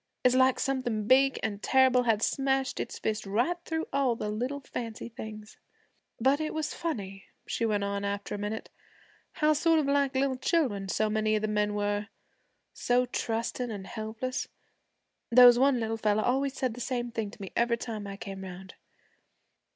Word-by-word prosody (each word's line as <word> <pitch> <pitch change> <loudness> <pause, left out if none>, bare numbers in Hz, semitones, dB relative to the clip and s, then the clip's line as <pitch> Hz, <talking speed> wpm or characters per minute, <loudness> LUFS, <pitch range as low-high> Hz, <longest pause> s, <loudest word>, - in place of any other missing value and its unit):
It's 250 - +5
like 260 0 +4
something 250 -6 -1
big 270 +3 +4
an' 205 -2 -2
terrible 260 +2 +4
had 225 -3 +1
smashed 270 -1 0
its - - -4
fist 215 -2 -2
right 240 - +1
through 320 0 -2
all 270 -4 +2
the 210 - -4
little 250 +6 -2
fancy 230 -3 -6
things. 215 -2 -9 0.6
'But 270 +5 +3
it 310 - -3
was 310 -1 -2
funny,' 195 - -5 0.2
she 230 - -1
went 205 -2 0
on 200 0 -2
after 200 0 -3
a 205 - -4
minute, 210 +2 -4 0.6
'how 305 0 +3
sort 325 +2 +3
of 305 - +2
like 280 -1 +1 0.3
children 235 - +1
so 215 +5 +1
many 215 0 +1
of 215 - -1
the - - +1
men 210 -1 0
were, 205 0 -1 0.7
so 245 +1 +1
trusting 235 +1 -2
an' 205 -3 -5
helpless. 220 +4 -4 0.8
There 250 +1 +8
was 245 0 +8
one 270 -1 +4
little 225 0 -2
fella 215 -1 +1
always 270 +2 0
said 255 -3 -1
the 245 - -8
same 245 -1 -2
thing 225 -3 -3
to 210 - -15
me 195 -2 -7
every 235 0 +2
time 220 -4 -5
I 195 0 -7
came 195 -1 -7
'round. 190 0 -9
230 Hz, 180 wpm, -29 LUFS, 210-260 Hz, 0.8 s, There